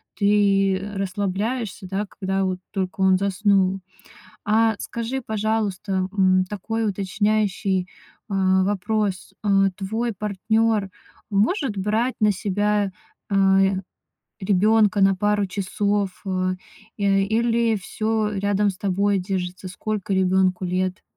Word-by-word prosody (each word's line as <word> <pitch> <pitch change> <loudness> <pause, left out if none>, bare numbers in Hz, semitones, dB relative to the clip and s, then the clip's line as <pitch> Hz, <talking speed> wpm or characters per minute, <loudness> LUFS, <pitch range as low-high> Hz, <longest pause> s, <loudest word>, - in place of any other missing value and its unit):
ты, 200 -2 +3
э, 200 +1 -6
расслабляешься, 195 +2 -2
да, 195 +2 -2
когда 195 0 -2
вот 185 -1 -2
только 190 -1 -3
он 190 -1 +5
заснул. 195 0 +2 0.7
А, 220 +1 +3
скажи, 235 +3 -4
пожалуйста, 210 -3 -1
м, 185 -2 +3
такой 225 +3 -3
уточняющий, 200 -1 0 0.4
а, 190 -1 +2
вопрос. 205 -1 -1
А 195 -1 +3
твой 220 +4 -2
партнёр 210 +1 0 0.4
может 215 - +1
брать 220 +6 0
на 210 -1 +4
себя, 205 +1 0 0.4
а, 195 -1 +4
й, 195 0 +1 0.6
ребёнка 205 +2 +3
на 195 0 +5
пару 205 +1 +1
часов, 200 0 -1
э? 185 -1 -1 0.4
Э, 195 -1 +2
или 230 +2 +1
всё 215 +2 -1
рядом 200 +1 +1
с 185 - -6
тобой 200 +1 +1
держится? 185 0 -4
Сколько 200 +1 -3
ребёнку 190 0 +2
лет? 185 +1 -2
200 Hz, 115 wpm, -23 LUFS, 190-210 Hz, 0.7 s, он